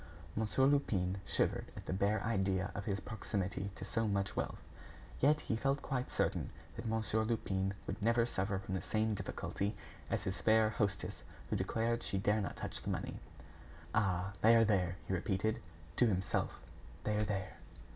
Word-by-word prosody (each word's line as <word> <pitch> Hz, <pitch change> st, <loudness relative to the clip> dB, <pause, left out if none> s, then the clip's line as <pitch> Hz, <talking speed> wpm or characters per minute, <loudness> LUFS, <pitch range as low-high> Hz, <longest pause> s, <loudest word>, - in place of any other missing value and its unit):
Monsieur 110 Hz, +5 st, +2 dB
Lupin 100 Hz, -10 st, +2 dB
shivered -, -, +1 dB
at -, -, -7 dB
the -, -, -2 dB
bare 100 Hz, +3 st, +2 dB
idea 95 Hz, -3 st, +1 dB
of 100 Hz, -, -4 dB
his 100 Hz, -2 st, 0 dB
proximity 100 Hz, -2 st, -2 dB
to -, -, -6 dB
so 115 Hz, -2 st, 0 dB
much 100 Hz, -1 st, 0 dB
wealth. -, -, -1 dB, 0.6 s
Yet 150 Hz, +3 st, +4 dB
he 110 Hz, -, -1 dB
felt 135 Hz, +5 st, +1 dB
quite 125 Hz, -1 st, -2 dB
certain -, -, 0 dB, 0.3 s
that -, -, -5 dB
Monsieur 110 Hz, 0 st, +1 dB
Lupin 100 Hz, -4 st, 0 dB
would 100 Hz, +5 st, -4 dB
never 115 Hz, +2 st, +4 dB
suffer 95 Hz, -4 st, 0 dB
from 95 Hz, 0 st, -5 dB
the 95 Hz, -, 0 dB
same 110 Hz, 0 st, +1 dB
difficulty 100 Hz, 0 st, -2 dB, 0.3 s
as -, -, 0 dB
his 95 Hz, +1 st, -3 dB
fair 110 Hz, 0 st, +5 dB
hostess 100 Hz, -2 st, -1 dB, 0.3 s
who -, -, +2 dB
declared 115 Hz, +1 st, 0 dB
she 95 Hz, -, -1 dB
dare 105 Hz, +2 st, +2 dB
not 100 Hz, -, -3 dB
touch -, -, -4 dB
the -, -, -4 dB
money. -, -, -2 dB, 0.7 s
"Ah! 95 Hz, -3 st, +1 dB
they 115 Hz, +2 st, +7 dB
are 115 Hz, 0 st, +7 dB
there!" 90 Hz, -4 st, +2 dB
he -, -, -2 dB
repeated, 100 Hz, +3 st, 0 dB, 0.4 s
to 125 Hz, -, +6 dB
himself; 95 Hz, -3 st, 0 dB, 0.4 s
"they 105 Hz, -, +1 dB
are 105 Hz, -, +2 dB
there!" 100 Hz, -3 st, -2 dB
105 Hz, 175 wpm, -36 LUFS, 95-110 Hz, 0.7 s, they